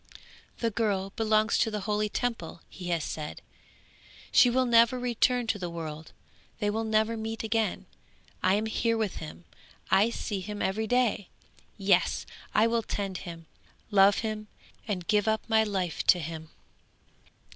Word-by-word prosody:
'The 230 -1 -1
girl 200 -3 -1
belongs 215 0 +2
to - - +2
the 210 -1 -3
holy 210 +1 0
Temple, 225 -9 -3
he 180 -2 -9
has 170 -3 0
said; 150 0 -5 0.9
she 245 - +6
will 255 +1 +2
never 235 +1 +5
return 245 0 +1
to 225 -2 -1
the 175 -2 -3
world, 160 -2 -7 0.5
they 205 -2 0
will 220 +2 -1
never 220 +1 +1
meet 225 0 -4
again. 220 -3 -1 0.6
I 185 +1 +3
am 215 +2 0
here 230 +1 0
with 215 -4 -2
him; 80 +2 -9 0.5
I 205 +4 +5
see 210 -3 -3
him 210 +2 -6
every 215 +3 -1
day. 240 -5 +1 0.5
Yes! 195 -3 +2 0.3
I 215 - +5
will 230 0 +1
tend 195 -4 -4
him, 165 -1 -9 0.5
love 200 0 +5
him, 215 -1 -4 0.4
and 180 -5 -3
give 210 0 +2
up 220 0 0
my 220 -1 +4
life 190 -6 -2
to - - +7
him.' 160 0 -6
210 Hz, 155 wpm, -28 LUFS, 185-225 Hz, 0.9 s, to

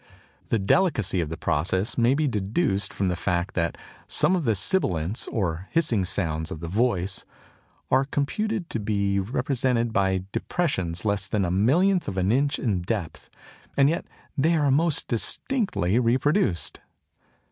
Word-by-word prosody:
The 115 - +1
delicacy 105 - +2
of 80 - -3
the 80 - -5
process 95 - 0
may 120 +2 +3
be 150 +1 +1
deduced 105 - 0
from 95 - -1
the 90 - 0
fact 90 +1 -1
that 85 -2 -1 0.3
some 185 - +3
of 170 -5 -2
the 110 -3 +2
sibilants, 95 - 0
or 90 -3 -2
hissing 120 - +1
sounds 80 -4 -2
of 80 - -6
the 85 - -6
voice, 100 -1 0 0.7
are 130 +1 +4
computed 180 +8 -2
to 115 - -2
be 100 -2 0
represented 120 +1 0
by 95 -2 +1
depressions 95 - -2
less 100 -2 +1
than 100 +1 0
a 85 - -1
millionth 170 - +3
of 95 - -4
an 95 +2 +2
inch 140 +4 +2
in 100 -8 -1
depth, 95 -3 -4 0.5
and 140 0 +5
yet 170 - -3 0.3
they 160 +5 +2
are 145 -3 +2
most 155 +2 +2
distinctly 125 - 0
reproduced! 125 - +1
110 Hz, 155 wpm, -25 LUFS, 95-140 Hz, 0.7 s, and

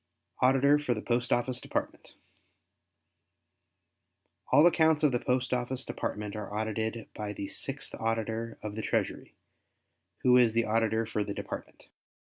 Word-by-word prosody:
Auditor 135 +3 +5
for 130 -5 0
the 110 - -4
Post 120 0 0
Office 120 +1 +1
Department - - -4 2.4
All 150 - +7
accounts 160 -3 +4
of 150 - +5
the 120 - +1
Post 125 0 0
Office 125 +1 -2
Department 105 -1 -4
are 105 -1 -6
audited 110 +1 -2
by 105 -1 -4
the 100 0 -5
Sixth - - -4
Auditor 115 0 -2
of 105 -1 -4
the 110 - -4
Treasury, - - -2 0.9
who 125 0 +6
is 120 -3 +5
the 115 0 +2
Auditor 110 0 +1
for 110 -1 -1
the 100 - -5
Department. - - -7
115 Hz, 140 wpm, -30 LUFS, 110-125 Hz, 2.4 s, All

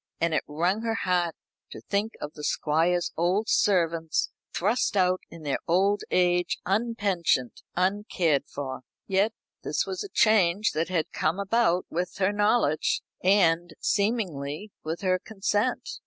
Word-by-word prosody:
And 170 -1 +1
it - - +2
wrung 175 +8 0
her 225 -1 -1
heart 180 -6 0 0.3
to - - -9
think 210 +2 -2
of 150 - -6
the 150 - -10
Squire's 165 +4 +1
old 185 +6 +1
servants 165 -5 +1 0.2
thrust 210 +2 0
out 185 -1 +2
in 165 -1 -11
their 145 -2 -1
old 195 +4 +2
age, 180 -1 +2
unpensioned, 195 - 0
uncared 180 -5 +1
for. 135 -3 -5 0.2
Yet 195 +3 +2 0.3
this - - 0
was 380 +2 -4
a 405 - -8
change 210 - +3
that 160 +3 -1
had 170 -4 -1
come 160 +4 0
about 200 -3 +2
with 180 +2 -2
her 190 +1 +2
knowledge, 205 -7 +2 0.2
and, 175 -3 +3
seemingly, 200 - -1
with 160 +4 -4
her 185 -1 +1
consent. 210 +3 -1
185 Hz, 140 wpm, -27 LUFS, 165-205 Hz, 0.3 s, change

